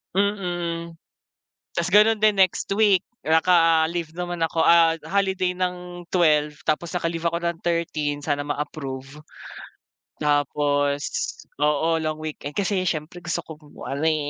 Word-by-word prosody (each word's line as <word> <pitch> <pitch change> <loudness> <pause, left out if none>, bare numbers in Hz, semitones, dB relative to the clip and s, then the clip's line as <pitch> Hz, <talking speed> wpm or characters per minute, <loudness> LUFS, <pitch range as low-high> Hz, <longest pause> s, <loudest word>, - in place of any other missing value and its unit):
Mm. 175 -4 -1 0.8
Tas 170 - +1
ganon 215 +1 +6
din 215 0 +4
next 190 -2 +2
week, 205 -4 +3 0.2
naka-leave 165 0 +3
naman 175 -1 -3
ako, 165 0 -1
ah, 165 -1 +5
holiday 190 -2 0
ng 180 -1 -4
12, 150 -4 +3 0.2
tapos 160 +2 0
naka-leave 165 -1 -2
ako 170 - -2
ng 170 -1 -2
13, 160 -4 -1
sana 145 0 -1
ma-approve. 145 -1 -5 1.0
Tapos 145 -1 +1 0.6
oo, 150 +3 +2
long 155 -1 -2
weekend. 150 -2 -6
Kasi 195 0 0
siyempre 170 +1 -3
gusto 170 0 -1
kong 155 -3 -13 0.2
ano 140 +3 -2
eh. 155 -2 +1
165 Hz, 125 wpm, -24 LUFS, 150-180 Hz, 1.0 s, ganon